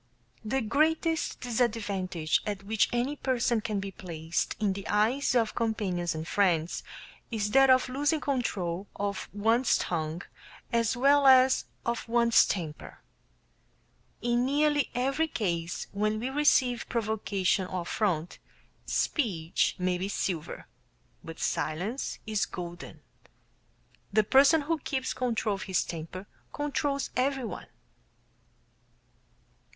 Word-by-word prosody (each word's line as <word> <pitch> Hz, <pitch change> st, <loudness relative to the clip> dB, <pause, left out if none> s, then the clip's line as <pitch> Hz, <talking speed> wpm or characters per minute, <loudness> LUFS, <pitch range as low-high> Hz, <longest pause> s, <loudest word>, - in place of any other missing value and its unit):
The 265 Hz, +5 st, -1 dB
greatest 315 Hz, +7 st, +1 dB
disadvantage 205 Hz, -9 st, 0 dB
at 200 Hz, -2 st, -3 dB
which 215 Hz, +2 st, +1 dB
any 245 Hz, +4 st, 0 dB
person 245 Hz, -4 st, 0 dB
can 210 Hz, -2 st, -2 dB
be 195 Hz, 0 st, -5 dB
placed 165 Hz, -3 st, -3 dB
in 205 Hz, -3 st, +1 dB
the 195 Hz, 0 st, -7 dB
eyes 235 Hz, +7 st, +2 dB
of 230 Hz, -3 st, +2 dB
companions 195 Hz, -7 st, -1 dB
and 160 Hz, +1 st, -5 dB
friends 175 Hz, -5 st, +1 dB, 0.5 s
is 210 Hz, -3 st, -2 dB
that 270 Hz, +2 st, +6 dB
of 255 Hz, 0 st, +5 dB
losing 290 Hz, +5 st, 0 dB
control 200 Hz, -10 st, -2 dB
of 200 Hz, -1 st, -3 dB
one's 225 Hz, +5 st, +2 dB
tongue 160 Hz, 0 st, -3 dB, 0.5 s
as 230 Hz, +1 st, +1 dB
well 280 Hz, +2 st, +5 dB
as 260 Hz, 0 st, +6 dB, 0.2 s
of 235 Hz, 0 st, -2 dB
one's 235 Hz, 0 st, +5 dB
temper. 160 Hz, -6 st, -5 dB, 1.2 s
In 240 Hz, 0 st, +2 dB
nearly 290 Hz, +1 st, +2 dB
every 275 Hz, +6 st, +1 dB
case 170 Hz, -, -2 dB
where 215 Hz, +2 st, 0 dB
we 245 Hz, +4 st, -3 dB
receive 265 Hz, -4 st, +2 dB
provocation 205 Hz, -4 st, 0 dB
or 185 Hz, -1 st, -3 dB
affront, 175 Hz, -3 st, -1 dB, 0.5 s
speech 180 Hz, -, 0 dB
may 180 Hz, -1 st, 0 dB
be 190 Hz, -, -2 dB
silver, 180 Hz, -5 st, -3 dB, 0.6 s
but 165 Hz, -, -8 dB
"silence 175 Hz, -, -2 dB
is 215 Hz, -2 st, 0 dB
golden." 175 Hz, 0 st, -8 dB, 1.1 s
The 215 Hz, +1 st, +4 dB
person 275 Hz, +8 st, +5 dB
who 315 Hz, +2 st, -1 dB
keeps 265 Hz, -2 st, -2 dB
control 230 Hz, -4 st, -1 dB
of 195 Hz, -, -5 dB
his 190 Hz, -2 st, +1 dB
temper 170 Hz, +3 st, -7 dB, 0.3 s
controls 290 Hz, -1 st, -2 dB
everyone. 260 Hz, -2 st, -1 dB
220 Hz, 120 wpm, -29 LUFS, 185-260 Hz, 1.2 s, that